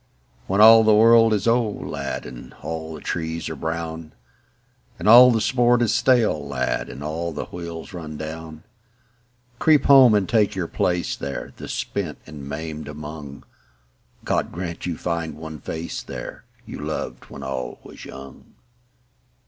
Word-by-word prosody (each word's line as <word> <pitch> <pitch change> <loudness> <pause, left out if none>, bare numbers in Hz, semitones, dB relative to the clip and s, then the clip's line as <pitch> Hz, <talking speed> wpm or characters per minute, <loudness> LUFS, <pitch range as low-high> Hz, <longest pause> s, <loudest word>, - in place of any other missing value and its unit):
When 100 +2 +2
all 110 +1 +9
the 110 -1 +5
world 115 +1 +6
is 105 -2 0
old, 115 -3 +1
lad, - - -4
And 60 -1 -10
all 80 -1 -5
the - - -10
trees 80 -1 -3
are - - -5
brown; 80 -1 -5 0.8
And 90 - -4
all 125 +3 +10
the 115 -2 +2
sport 120 +1 +3
is 110 -1 +1
stale, 120 - +2
lad, 65 -3 -2
And 70 - -8
all 80 +3 -3
the - - -5
wheels 85 0 -8
run 80 -4 -7
down: 80 +1 -8 1.0
Creep 150 -4 +4
home 130 -5 +7
and 100 -3 +1
take 105 -2 +2
your 90 -3 -2
place 90 0 -1
there, 70 0 -6
The - - -8
spent - - -4
and 75 -3 -9
maimed 80 +1 -6
among: 75 -1 -8 0.8
God - - 0
grant 85 0 -5
you 85 -3 -3
find 85 -2 -3
one 80 -1 -8
face 80 +5 -5
there, - - -8 0.2
You - - -8
loved 60 - -5
when 70 - -10
all 65 -1 -4
was - - -12
young. 70 0 -12
85 Hz, 155 wpm, -23 LUFS, 75-110 Hz, 1.0 s, all